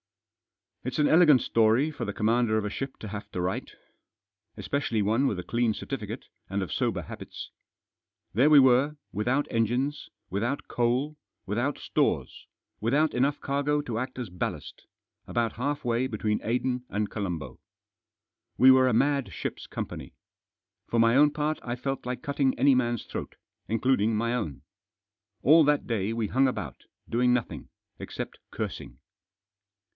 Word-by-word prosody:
It's 130 Hz, 0 st, -3 dB
an 150 Hz, -1 st, +4 dB
elegant 155 Hz, -6 st, +6 dB
story 115 Hz, +7 st, +3 dB
for 145 Hz, -, -5 dB
the -, -, -3 dB
commander 110 Hz, 0 st, +2 dB
of 105 Hz, -, -1 dB
a -, -, -1 dB
ship 135 Hz, +4 st, -5 dB
to 110 Hz, -, -6 dB
have 105 Hz, 0 st, -7 dB
to -, -, -3 dB
write. 90 Hz, +1 st, -2 dB, 0.8 s
Especially 120 Hz, -7 st, -1 dB
one 115 Hz, +7 st, +2 dB
with 105 Hz, -, -1 dB
a 90 Hz, -, -4 dB
clean 120 Hz, 0 st, 0 dB
cer -, -, -7 dB
tificate, -, -, -5 dB, 0.3 s
and 100 Hz, +1 st, -1 dB
of 95 Hz, -, -5 dB
sober -, -, -1 dB
habits. -, -, -9 dB, 0.8 s
There 130 Hz, +9 st, +4 dB
we 150 Hz, -2 st, +8 dB
were, 130 Hz, +3 st, +4 dB, 0.2 s
with 105 Hz, +2 st, -3 dB
out 135 Hz, +4 st, +2 dB
engines, 125 Hz, +6 st, 0 dB, 0.2 s
without 115 Hz, +9 st, -2 dB
coal, 125 Hz, +5 st, 0 dB, 0.3 s
without 120 Hz, +9 st, -1 dB
stores, -, -, -1 dB, 0.3 s
without 145 Hz, +8 st, +2 dB
enough 140 Hz, +3 st, +1 dB
cargo 145 Hz, +1 st, 0 dB
to 120 Hz, -6 st, -3 dB
act 130 Hz, +1 st, -5 dB
as 120 Hz, -7 st, -5 dB
ballast, 90 Hz, -, -5 dB, 0.4 s
about 115 Hz, -1 st, 0 dB
half 145 Hz, +3 st, -3 dB
way 120 Hz, +2 st, +1 dB
between 110 Hz, -3 st, -1 dB
Aden 125 Hz, +2 st, -1 dB
and 105 Hz, 0 st, -2 dB
Colombo. 85 Hz, -, -4 dB, 1.0 s
We 130 Hz, +1 st, +8 dB
were 130 Hz, 0 st, +6 dB
a 125 Hz, -, +2 dB
mad 140 Hz, +2 st, +2 dB
ship's -, -, -5 dB
company. -, -, -6 dB, 0.7 s
For 120 Hz, -, -1 dB
my 115 Hz, +1 st, +5 dB
own 145 Hz, +2 st, +6 dB
part 150 Hz, +1 st, -2 dB
I 120 Hz, 0 st, -3 dB
felt 135 Hz, 0 st, -4 dB
like 125 Hz, +3 st, -4 dB
cutting 140 Hz, -3 st, 0 dB
any 135 Hz, +3 st, +5 dB
man's 120 Hz, -3 st, 0 dB
throat, -, -, -6 dB, 0.3 s
including 115 Hz, -1 st, +2 dB
my 115 Hz, +2 st, 0 dB
own. 80 Hz, -, -3 dB, 0.8 s
All 155 Hz, +5 st, +7 dB
that 150 Hz, 0 st, +2 dB
day 110 Hz, -3 st, -1 dB
we 115 Hz, -1 st, -1 dB
hung 130 Hz, +6 st, +3 dB
about, 130 Hz, -, -5 dB, 0.2 s
doing 125 Hz, +1 st, +2 dB
nothing, 95 Hz, -, -4 dB, 0.3 s
except -, -, -6 dB
cursing. -, -, -5 dB
125 Hz, 160 wpm, -27 LUFS, 110-140 Hz, 1.0 s, we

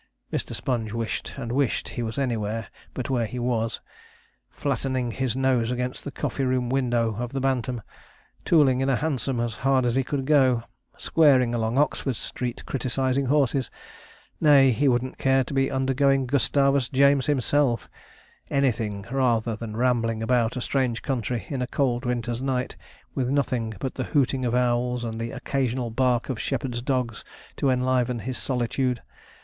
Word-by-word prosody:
Mr. -, -, -2 dB
Sponge 115 Hz, -5 st, -2 dB
wished 115 Hz, -1 st, -3 dB
and 120 Hz, -4 st, -4 dB
wished 135 Hz, -2 st, 0 dB
he 120 Hz, -, -4 dB
was 110 Hz, +1 st, -4 dB
anywhere 115 Hz, -5 st, -2 dB, 0.3 s
but 130 Hz, +1 st, -3 dB
where 120 Hz, -3 st, +1 dB
he 125 Hz, -, -7 dB
was 120 Hz, -2 st, -1 dB, 0.7 s
flattening 130 Hz, -3 st, -2 dB
his 130 Hz, 0 st, -2 dB
nose 130 Hz, -3 st, +2 dB
against 125 Hz, 0 st, -3 dB
the -, -, -4 dB
coffee 135 Hz, 0 st, -3 dB
room 130 Hz, -1 st, 0 dB
window 120 Hz, -4 st, +1 dB
of 120 Hz, +1 st, -4 dB
the 135 Hz, -, -1 dB
Bantam, 125 Hz, -3 st, -1 dB, 0.6 s
tooling 140 Hz, -6 st, +4 dB
in 135 Hz, -, +1 dB
a 135 Hz, -, +3 dB
hansom 135 Hz, -3 st, -1 dB
as 120 Hz, -1 st, -1 dB
hard 130 Hz, -1 st, +3 dB
as 120 Hz, -, +1 dB
he 135 Hz, +1 st, +2 dB
could 135 Hz, 0 st, -3 dB
go, 130 Hz, -5 st, +4 dB, 0.3 s
squaring 130 Hz, -7 st, +4 dB
along 115 Hz, +1 st, 0 dB
Oxford 140 Hz, -2 st, +1 dB
Street 125 Hz, +2 st, -5 dB
criticizing 130 Hz, +1 st, 0 dB
horses 135 Hz, -3 st, +2 dB, 0.7 s
nay, 140 Hz, -4 st, +6 dB
he 140 Hz, +5 st, +1 dB
wouldn't 130 Hz, 0 st, 0 dB
care 135 Hz, 0 st, +3 dB
to 125 Hz, -, -7 dB
be 135 Hz, 0 st, +2 dB
undergoing 135 Hz, 0 st, +2 dB
Gustavus 140 Hz, 0 st, +2 dB
James 140 Hz, 0 st, +4 dB
himself 135 Hz, -4 st, +1 dB, 0.6 s
anything, 115 Hz, -7 st, 0 dB
rather 120 Hz, -4 st, +1 dB
than 110 Hz, -1 st, -6 dB
rambling 115 Hz, -2 st, +1 dB
about 120 Hz, 0 st, +1 dB
a -, -, -2 dB
strange 125 Hz, -3 st, -1 dB
country 120 Hz, -5 st, -2 dB
in 135 Hz, -3 st, -3 dB
a 125 Hz, -, -1 dB
cold 125 Hz, -1 st, 0 dB
winter's 120 Hz, -1 st, -2 dB
night, 130 Hz, -1 st, -1 dB, 0.4 s
with 130 Hz, -2 st, -1 dB
nothing 125 Hz, -5 st, 0 dB
but 130 Hz, -, -3 dB
the 130 Hz, -, -3 dB
hooting 135 Hz, -3 st, +1 dB
of 120 Hz, 0 st, 0 dB
owls 125 Hz, 0 st, +1 dB
and 115 Hz, -1 st, -4 dB
the 115 Hz, -, -3 dB
occasional 125 Hz, -2 st, -2 dB
bark 125 Hz, 0 st, +1 dB
of 130 Hz, -5 st, -3 dB
shepherds' 125 Hz, -2 st, -2 dB
dogs 125 Hz, -4 st, -1 dB, 0.3 s
to 140 Hz, -, +1 dB
enliven 125 Hz, -1 st, +1 dB
his 120 Hz, +3 st, -4 dB
solitude. 125 Hz, -1 st, -1 dB
125 Hz, 165 wpm, -25 LUFS, 120-135 Hz, 0.7 s, nay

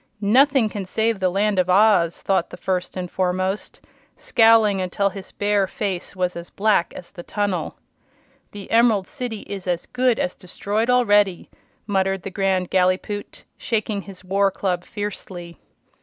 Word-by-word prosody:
"Nothing 270 Hz, -2 st, +5 dB
can 205 Hz, -2 st, -5 dB
save 220 Hz, +2 st, 0 dB
the 185 Hz, -1 st, +2 dB
Land 200 Hz, +1 st, +1 dB
of 180 Hz, 0 st, +1 dB
Oz!" 185 Hz, -3 st, +4 dB
thought 190 Hz, -3 st, +1 dB
the -, -, -10 dB
First 185 Hz, 0 st, -3 dB
and 180 Hz, -1 st, -5 dB
Foremost, 185 Hz, +2 st, -2 dB, 0.4 s
scowling 225 Hz, -4 st, +4 dB
until 190 Hz, +2 st, 0 dB
his 195 Hz, -1 st, -10 dB
bear 205 Hz, -1 st, +1 dB
face 190 Hz, -2 st, -4 dB
was 180 Hz, -1 st, -1 dB
as 170 Hz, 0 st, -7 dB
black 205 Hz, -4 st, +1 dB
as 180 Hz, -, -10 dB
the 180 Hz, -, -9 dB
tunnel. 205 Hz, 0 st, -2 dB, 0.8 s
"The 205 Hz, -1 st, -10 dB
Emerald 225 Hz, -4 st, +4 dB
City 245 Hz, -5 st, -5 dB
is 195 Hz, -2 st, -7 dB
as 175 Hz, -1 st, -1 dB
good 250 Hz, -2 st, +1 dB
as 180 Hz, -, -1 dB
destroyed 205 Hz, +5 st, -3 dB
already!" 205 Hz, -7 st, +3 dB, 0.3 s
muttered 195 Hz, -2 st, 0 dB
the 195 Hz, -, -6 dB
Grand 190 Hz, -2 st, 0 dB
Gallipoot, 185 Hz, +2 st, -1 dB, 0.2 s
shaking 215 Hz, -2 st, -1 dB
his 190 Hz, -2 st, -12 dB
war 195 Hz, +2 st, +2 dB
club 185 Hz, -2 st, -2 dB
fiercely. 185 Hz, -4 st, -7 dB
195 Hz, 155 wpm, -22 LUFS, 185-210 Hz, 0.8 s, Nothing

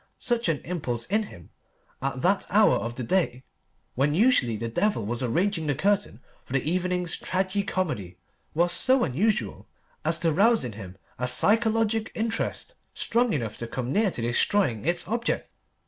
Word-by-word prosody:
Such 240 Hz, -6 st, 0 dB
an 155 Hz, -4 st, 0 dB
impulse 125 Hz, -9 st, -3 dB
in 215 Hz, +4 st, +1 dB
him 85 Hz, -2 st, -14 dB, 0.5 s
at 135 Hz, -1 st, -3 dB
that 195 Hz, +3 st, +2 dB
hour 210 Hz, +2 st, +5 dB
of 120 Hz, +1 st, -4 dB
the 125 Hz, -, -4 dB
day, 130 Hz, -4 st, 0 dB, 0.5 s
when 145 Hz, +3 st, +1 dB
usually 185 Hz, -, +3 dB
the 115 Hz, -, -3 dB
devil 115 Hz, -, 0 dB
was 120 Hz, +3 st, -3 dB
arranging 165 Hz, -, 0 dB
the 145 Hz, -, +1 dB
curtain 200 Hz, -, 0 dB, 0.2 s
for -, -, -10 dB
the 135 Hz, +1 st, 0 dB
evening's 180 Hz, -1 st, -1 dB
tragi 190 Hz, +2 st, -1 dB
comedy, 150 Hz, -, -3 dB, 0.4 s
was 175 Hz, +2 st, +2 dB
so 260 Hz, -1 st, +3 dB
unusual 205 Hz, -, -1 dB, 0.4 s
as -, -, +3 dB
to 165 Hz, -2 st, +1 dB
rouse 220 Hz, -, +3 dB
in 120 Hz, -, -4 dB
him 95 Hz, -3 st, -10 dB, 0.2 s
a 125 Hz, -, -1 dB
psychologic 225 Hz, -, +2 dB
interest 225 Hz, -, -2 dB, 0.2 s
strong 240 Hz, 0 st, +1 dB
enough 115 Hz, -7 st, -2 dB
to 115 Hz, -, -5 dB
come 125 Hz, +2 st, -3 dB
near 210 Hz, 0 st, +3 dB
to 120 Hz, -, -5 dB
destroying 120 Hz, -, +1 dB
its 170 Hz, -1 st, +1 dB
object. 235 Hz, +4 st, -2 dB
175 Hz, 165 wpm, -26 LUFS, 125-210 Hz, 0.5 s, hour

